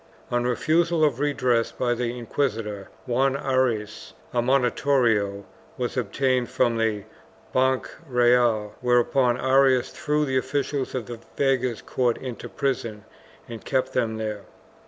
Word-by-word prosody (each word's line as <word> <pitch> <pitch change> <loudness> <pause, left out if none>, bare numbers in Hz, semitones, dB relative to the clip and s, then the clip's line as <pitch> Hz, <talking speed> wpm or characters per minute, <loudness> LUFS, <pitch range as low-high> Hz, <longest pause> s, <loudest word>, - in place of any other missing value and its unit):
On 120 0 +1
refusal 160 +6 +2
of 140 -5 +2
redress 130 -5 +1
by 120 -1 0
the 120 0 -3
inquisitor, 110 -5 -3 0.2
Juan 130 +2 +1
Arias, 120 - -1 0.2
a 120 - +2
monitorio 120 -5 +2 0.3
was 125 -1 -3
obtained 130 -1 0
from 115 -1 +1
the 110 -3 0 0.5
Banch 130 0 +2 0.2
Reyal, 120 -4 +3
whereupon 125 0 +2
Arias 130 -1 +3
threw 150 0 0
the 130 -2 0
officials 140 0 -2
of 125 -4 -3
the 120 -1 -8 0.2
veguer's 130 -4 +1
court 120 -2 0
into 125 -3 -7
prison 115 -6 -3 0.4
and 115 -2 -8
kept 130 -1 -1
them 110 -1 0
there. 105 -2 -4
125 Hz, 130 wpm, -24 LUFS, 115-135 Hz, 0.5 s, Reyal